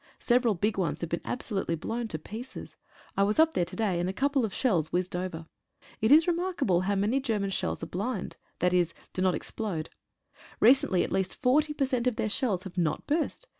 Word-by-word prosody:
Several 240 -3 +2
big 200 +3 0
ones 170 -4 -1
have 170 - -4
been 170 - -1
absolutely 195 -8 -2
blown 230 +8 -3
to 160 - -4
pieces. 220 - -8 0.4
I - - +1
was 205 +2 +2
up 320 0 +5
there 175 - +1
to - - -8
day, 200 -6 0
and 175 +1 0
a - - -3
couple 275 +3 +1
of 220 - -1
shells 180 - +1
whizzed 180 0 -1
over. 180 -3 -4 0.6
It 220 +3 +3
is 315 +2 +8
remarkable 340 - +1
how 200 +2 0
many 210 +7 +1
German 215 -7 -1
shells 185 - -2
are - - -1
"blind" 200 +4 -3
— - - -24
i.e., 180 0 +4 0.3
do 185 - -2
not 185 -2 +3
explode. 175 -4 -4 0.7
Recently 225 -6 +5
at - - -4
least 190 -1 0
40 300 +4 +2
per 275 - +1
cent 255 -2 0
of 250 - +1
their 215 - -1
shells 205 -7 0
have 185 -1 -5
not 155 -3 0
burst. 320 +10 -1
205 Hz, 210 wpm, -28 LUFS, 180-255 Hz, 0.7 s, is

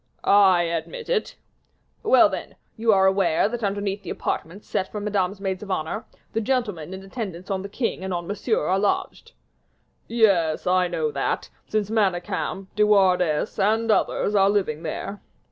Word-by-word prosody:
"I 190 -3 +5
admit 170 - -4
it." 485 -3 0 0.7
"Well, 460 +1 +6
then, - - -6 0.2
you 225 0 +2
are 190 -2 +4
aware 190 -3 +3
that 235 +1 -5
underneath 200 0 -1
the - - -8
apartments 180 +6 -4
set 190 - -2
for 210 - -4
Madame's 200 -2 -1
maids 190 -2 -3
of 210 - -8
honor, 185 +5 -2 0.3
the 225 - 0
gentlemen 210 - -1
in 190 0 -7
attendance 195 -3 -6
on 190 -1 -1
the 200 - -7
king 220 -3 -2
and 190 - -4
on 175 -1 -2
Monsieur 210 -1 -1
are 190 +4 +2
lodged." 205 0 -2 0.7
"Yes, 195 -9 +2
I 180 0 +3
know 160 -3 -1
that, 140 -1 -2 0.2
since 215 -1 -1
Manicamp, 190 -2 -1
De 210 - 0
Wardes, 185 -6 +3
and 220 +3 +2
others 210 - +1
are 195 -1 +4
living 185 -7 0
there." 195 +5 -5
195 Hz, 165 wpm, -24 LUFS, 180-210 Hz, 0.7 s, Well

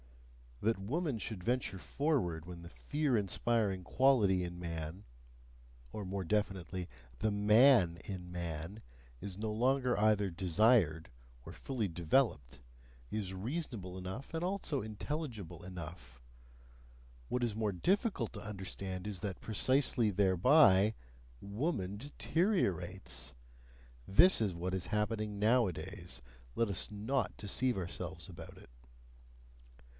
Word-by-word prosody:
That 110 -1 +1
woman 140 - -1
should 105 -4 -5
venture 120 -4 0
forward 95 - -1
when 85 -1 -8
the 85 - -10
fear 145 - 0
inspiring 100 -1 0
quality 105 -5 +3
in 90 0 -6
man 85 +2 -5 0.9
or 105 - -5
more 95 +1 -3
definitely, 95 -2 -1 0.3
the 110 - +1
MAN 105 -3 +5
in 90 -3 -6
man 85 +3 -5 0.4
is 95 -1 -5
no 110 0 -2
longer 125 +3 +2
either 105 -2 +3
desired 90 -1 +3 0.4
or - - -8
fully 120 -6 -3
developed, 85 - +1 0.5
is 100 -3 -3
reasonable 105 - -4
enough 95 - -6
and 165 - -1
also 180 -6 -1
intelligible 110 - -5
enough; 85 -8 -9 1.1
what 125 - -1
is 115 -3 0
more 110 -2 0
difficult 180 - 0
to - - -7
understand 95 -2 -5
is 100 -4 -3
that 100 -3 -5
precisely 125 +1 +2
thereby 100 - +5 0.5
woman 100 - -2
deteriorates. 115 - -1 0.7
This 145 - +6
is 100 -4 +1
what 90 +2 -3
is 95 -2 -2
happening 105 -1 -1
nowadays: 105 - 0 0.3
let 115 -2 +1
us 95 -2 0
not 105 +1 -1
deceive 120 +4 0
ourselves 90 -1 -5
about 85 - -10
it! - - -15
100 Hz, 120 wpm, -34 LUFS, 90-120 Hz, 1.1 s, This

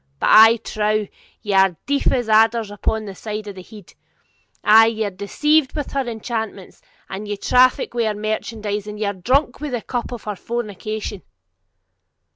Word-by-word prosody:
But, - - +1
I 225 +2 +8
trow, 215 -1 -1 0.4
ye 205 - -2
are 190 -3 +4
deaf 280 0 +1
as 245 -3 -1
adders 220 0 +3
upon 215 +2 -2
that 195 -2 -9
side 215 -1 -5
of 205 - -6
the 190 - -10
head; 205 0 -14 0.7
ay, 225 +1 +7
ye 220 -1 -1
are 205 - -3
deceived 270 +10 +1
with 295 -3 -4
her 275 -2 -2
enchantments, 220 -4 -5 0.3
and 200 +2 -7
ye 205 0 -3
traffic 250 +5 +3
with 235 -2 0
her 215 - -1
merchandise, 215 -1 -3
and 210 0 -7
ye 215 - -1
are 200 - -1
drunk 250 - 0
with 295 -4 -4
the 240 - -2
cup 245 -1 -4
of 240 - -7
her 210 -1 -4
fornication!' 215 -2 -5
215 Hz, 180 wpm, -20 LUFS, 205-235 Hz, 0.7 s, I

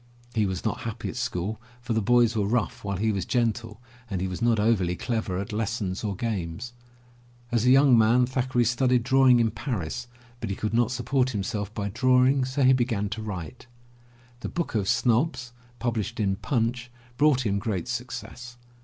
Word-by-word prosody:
He 110 -3 +1
was 95 +2 -4
not 110 - -1
happy 115 0 -5
at - - -7
school, 110 -4 -3 0.2
for 120 -1 -3
the 110 - +1
boys 120 +1 +3
were 105 -2 +1
rough 115 +1 -1
while 100 -2 -2
he 110 +3 +1
was 100 -3 -2
gentle, 115 -2 -1 0.3
and 95 -3 -2
he 95 - -1
was 90 +2 -5
not 115 -2 +3
overly 100 -5 +2
clever 110 -4 -2
at 100 +3 -4
lessons 105 -3 -2
or 100 -2 -2
games. 105 +1 -4 0.8
As 120 0 +1
a - - +6
young 135 0 +6
man, 115 +2 +4
Thackeray 130 -1 0
studied 125 +1 +2
drawing 130 -1 +5
in 115 -1 +2
Paris, 120 - -4 0.3
but 115 - -4
he 95 - -2
could 110 +2 -3
not 120 -1 +3
support 125 +1 0
himself 105 -2 -3
by 100 -2 -2
drawing, 130 +4 +3
so 130 +2 -1
he 130 +1 +6
began 115 -5 0
to 110 +2 -5
write. 100 -1 -7 0.7
The - - -5
Book 170 - -3
oj 105 -4 -1
Snobs, 125 +2 +1 0.2
published 115 -4 -2
in 100 -2 +1
Punchy 120 +2 -1 0.3
brought 140 -3 +3
him 100 -1 +1
great 100 -5 -3
success. 125 0 -6
115 Hz, 185 wpm, -26 LUFS, 105-125 Hz, 0.8 s, a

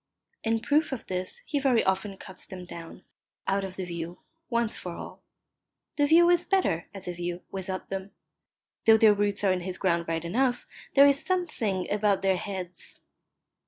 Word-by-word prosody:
In 225 0 +1
proof 295 +5 +2
of 265 - -4
this 185 - -4
he 290 - -1
very 265 -4 +3
often 190 +1 0
cuts 190 -1 -6
them 180 -1 -8
down, 170 +1 -10 0.4
out 195 0 +1
of 190 -1 -5
the 190 - -3
view, 170 0 -5 0.3
once 235 -2 +1
for 175 - -6
all. - - -9 0.7
The 290 -1 +3
view 335 +3 +7
is 350 0 +4
better, 360 - +1
as 195 -3 -8
a 180 - -2
view, 175 0 -4
without 190 -1 -4
them. 195 0 -4 0.8
Though 225 0 +8
their 220 -1 +7
roots 205 0 0
are 195 - +4
in 180 - -2
his 185 +1 -4
ground 170 -3 +1
right 165 0 -2
enough, 245 +7 +1 0.3
there 280 - +9
is 280 0 +4
a - - -11
something 270 - -1
about 205 -2 +2
their 190 -1 +3
heads 180 -2 -7
195 Hz, 185 wpm, -28 LUFS, 180-245 Hz, 0.8 s, there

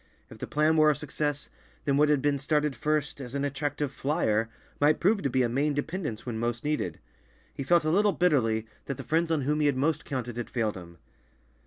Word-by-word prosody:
If - - -12
the - - -5
plan 155 +2 +2
were 155 0 +6
a 150 - +3
success, 145 0 -3 0.3
then 140 - +2
what 150 +1 +4
had 145 -3 +2
been 145 -1 +2
started 150 0 0
first 150 +2 -1
as 125 0 -7
an 140 0 0
attractive 145 0 -2
"flyer" 115 -7 0 0.3
might 150 +1 +4
prove 200 +3 +3
to 140 - 0
be 130 0 +2
a - - +2
main 140 +5 0
dependence 145 - -3
when 115 -3 -3
most 120 0 -2
needed. 145 - -1 0.6
He - - -6
felt 165 +3 +3
a 155 - +2
little 205 +4 +4
bitterly 120 - +2 0.2
that 140 - -4
the - - -6
friends 165 +1 +1
on 160 -3 +1
whom 150 +3 0
he 150 - +3
had 140 -2 +1
most 150 +3 +1
counted 125 -3 -4
had 120 - -4
failed 110 -4 -1
him. 85 -2 -11
145 Hz, 220 wpm, -28 LUFS, 125-150 Hz, 0.6 s, were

